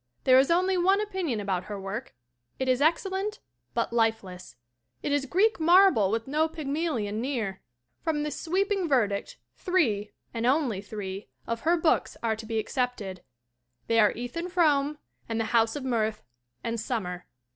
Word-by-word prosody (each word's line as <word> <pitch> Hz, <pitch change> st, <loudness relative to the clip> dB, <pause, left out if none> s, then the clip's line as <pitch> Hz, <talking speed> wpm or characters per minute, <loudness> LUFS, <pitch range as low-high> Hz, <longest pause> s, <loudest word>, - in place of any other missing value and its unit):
There 255 Hz, 0 st, +7 dB
is 270 Hz, -, +3 dB
only 365 Hz, +2 st, +3 dB
one 385 Hz, +3 st, +4 dB
opinion 375 Hz, -, -2 dB
about 190 Hz, -3 st, -2 dB
her 205 Hz, -1 st, -6 dB
work: 200 Hz, +6 st, -6 dB, 0.4 s
it 260 Hz, -, -2 dB
is 255 Hz, +1 st, +2 dB
excellent 385 Hz, +7 st, +1 dB, 0.4 s
but -, -, 0 dB
lifeless; 200 Hz, -, -1 dB, 0.5 s
it -, -, -1 dB
is 285 Hz, -1 st, +1 dB
Greek 410 Hz, -, +2 dB
marble 340 Hz, -, +6 dB
with 225 Hz, +2 st, -1 dB
no 305 Hz, +3 st, +2 dB
Pygmalion 280 Hz, -9 st, -2 dB
near. 230 Hz, -8 st, -2 dB, 0.4 s
From 300 Hz, -2 st, -1 dB
this 300 Hz, -2 st, -4 dB
sweeping 380 Hz, +1 st, 0 dB
ver 255 Hz, -6 st, +4 dB
dict 200 Hz, 0 st, -5 dB, 0.2 s
three 230 Hz, -, +1 dB, 0.2 s
and 230 Hz, 0 st, -1 dB
only 255 Hz, -8 st, +1 dB
three 200 Hz, -4 st, -6 dB, 0.2 s
of 230 Hz, 0 st, -2 dB
her 340 Hz, +2 st, +3 dB
books 325 Hz, -1 st, +1 dB
are 225 Hz, -1 st, +1 dB
to 220 Hz, 0 st, -9 dB
be 225 Hz, 0 st, -2 dB
excepted. 220 Hz, -6 st, -2 dB, 0.6 s
They 230 Hz, 0 st, +2 dB
are 210 Hz, -2 st, +6 dB
Ethan 245 Hz, +10 st, -5 dB
Frome 300 Hz, -5 st, +2 dB, 0.3 s
and 225 Hz, 0 st, -1 dB
The 225 Hz, 0 st, -2 dB
House 225 Hz, -1 st, +3 dB
of 285 Hz, -3 st, -5 dB
Mirth 220 Hz, -4 st, 0 dB, 0.4 s
and 230 Hz, 0 st, -2 dB
Summer. 180 Hz, -6 st, -3 dB
250 Hz, 165 wpm, -27 LUFS, 215-325 Hz, 0.6 s, There